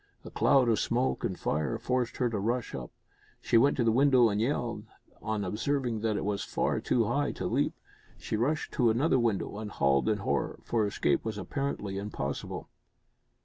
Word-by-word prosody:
A -, -, -8 dB
cloud 130 Hz, -3 st, +4 dB
of 115 Hz, -3 st, +3 dB
smoke 125 Hz, +2 st, 0 dB
and 95 Hz, -, -2 dB
fire 75 Hz, +1 st, -1 dB
forced 125 Hz, -2 st, -1 dB
her 125 Hz, -, +2 dB
to 110 Hz, -3 st, -2 dB
rush 120 Hz, +4 st, -1 dB
up. 65 Hz, -2 st, -5 dB, 0.5 s
She -, -, -1 dB
went 135 Hz, +5 st, +5 dB
to 125 Hz, -, +2 dB
the 115 Hz, -, +3 dB
window 130 Hz, -1 st, +5 dB
and 105 Hz, 0 st, 0 dB
yelled, 115 Hz, -3 st, -1 dB, 0.4 s
on 110 Hz, -1 st, -2 dB
observing 120 Hz, +4 st, -1 dB
that 110 Hz, -2 st, 0 dB
it -, -, -3 dB
was 100 Hz, -1 st, -1 dB
far -, -, -1 dB
too -, -, +1 dB
high -, -, 0 dB
to -, -, -5 dB
leap. -, -, 0 dB, 0.4 s
She -, -, -4 dB
rushed 145 Hz, +8 st, 0 dB
to 120 Hz, -3 st, +3 dB
another 130 Hz, +4 st, +2 dB
window 105 Hz, -3 st, -1 dB
and 110 Hz, -1 st, -5 dB
howled 70 Hz, +5 st, +2 dB
in 105 Hz, -, +2 dB
horror, 100 Hz, -, -1 dB
for 110 Hz, -3 st, +1 dB
escape 100 Hz, -, 0 dB
was 110 Hz, -2 st, -4 dB
apparently 105 Hz, -3 st, -3 dB
impossible. 70 Hz, -9 st, -4 dB
115 Hz, 190 wpm, -29 LUFS, 105-125 Hz, 0.5 s, went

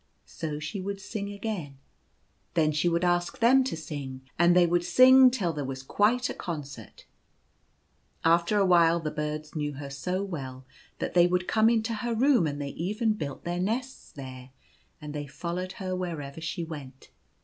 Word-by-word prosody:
So 155 Hz, -3 st, -5 dB
she 160 Hz, +6 st, -5 dB
would 200 Hz, +1 st, -4 dB
sing 200 Hz, +1 st, -5 dB
again. 200 Hz, -9 st, -5 dB, 0.8 s
Then 155 Hz, -2 st, +3 dB
she 155 Hz, +3 st, +1 dB
would 170 Hz, +1 st, 0 dB
ask 175 Hz, +6 st, +1 dB
them 260 Hz, +2 st, +5 dB
to 210 Hz, -, -3 dB
sing, 140 Hz, -4 st, -6 dB, 0.2 s
and 175 Hz, 0 st, +5 dB
they 180 Hz, -1 st, +6 dB
would 175 Hz, 0 st, +1 dB
sing 255 Hz, +8 st, +7 dB
till 200 Hz, -10 st, -1 dB
there 145 Hz, -2 st, -3 dB
was 135 Hz, 0 st, -5 dB
quite 230 Hz, -, +2 dB
a -, -, -4 dB
con 165 Hz, -5 st, -4 dB
cert. 135 Hz, -7 st, -12 dB, 1.2 s
After 170 Hz, +5 st, +3 dB
a 200 Hz, -, +4 dB
while 170 Hz, -2 st, +5 dB
the 155 Hz, -2 st, -3 dB
birds 150 Hz, 0 st, -4 dB
knew 150 Hz, -1 st, -2 dB
her 140 Hz, 0 st, -7 dB
so 180 Hz, +7 st, -2 dB
well 135 Hz, -9 st, -6 dB, 0.3 s
that -, -, -3 dB
they 175 Hz, -1 st, +6 dB
would 180 Hz, 0 st, 0 dB
come 220 Hz, 0 st, +4 dB
into 230 Hz, 0 st, +1 dB
her 235 Hz, +1 st, -2 dB
room, 245 Hz, -, +4 dB
and 145 Hz, -1 st, -4 dB
they 140 Hz, -1 st, -3 dB
even 210 Hz, -, -1 dB
built 145 Hz, -9 st, -6 dB
their 175 Hz, +1 st, -2 dB
nests 240 Hz, +8 st, -3 dB
there, 130 Hz, -2 st, -9 dB, 0.5 s
and 150 Hz, -1 st, -8 dB
they 145 Hz, -1 st, -5 dB
followed 175 Hz, +6 st, -4 dB
her 185 Hz, -1 st, -4 dB
wherever 160 Hz, -5 st, -5 dB
she 170 Hz, +1 st, -3 dB
went. 140 Hz, -5 st, -9 dB
170 Hz, 180 wpm, -28 LUFS, 150-200 Hz, 1.2 s, sing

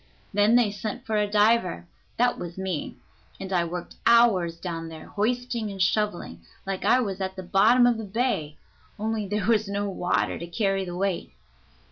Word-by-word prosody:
Then 205 Hz, +3 st, +4 dB
they 240 Hz, -4 st, +4 dB
sent 215 Hz, +5 st, -5 dB
for 220 Hz, -3 st, -2 dB
a 210 Hz, -1 st, +1 dB
diver 210 Hz, -4 st, +2 dB, 0.3 s
that 245 Hz, +1 st, +2 dB
was 175 Hz, 0 st, -7 dB
me 190 Hz, -5 st, -4 dB, 0.4 s
and 190 Hz, 0 st, -5 dB
I 175 Hz, -2 st, +2 dB
worked 175 Hz, +1 st, -6 dB
hours 220 Hz, -8 st, +4 dB
down 165 Hz, -2 st, -5 dB
there 160 Hz, -1 st, -10 dB
hoisting 235 Hz, +1 st, -2 dB
and 195 Hz, -1 st, -8 dB
shoveling, 180 Hz, -, 0 dB, 0.2 s
like 195 Hz, -1 st, -3 dB
I 255 Hz, -, +4 dB
was 200 Hz, -5 st, -3 dB
at 190 Hz, 0 st, -3 dB
the 185 Hz, -, -6 dB
bottom 215 Hz, +7 st, +5 dB
of 240 Hz, -2 st, +2 dB
the -, -, -4 dB
bay, 205 Hz, -, -2 dB, 0.4 s
only 215 Hz, -1 st, -2 dB
there 210 Hz, -1 st, -1 dB
was 220 Hz, -2 st, +2 dB
no 200 Hz, +1 st, -2 dB
water 180 Hz, -1 st, -1 dB
to 170 Hz, -, -6 dB
carry 195 Hz, +1 st, 0 dB
the 175 Hz, -1 st, -6 dB
weight. 195 Hz, -2 st, -2 dB
200 Hz, 180 wpm, -26 LUFS, 180-225 Hz, 0.4 s, bottom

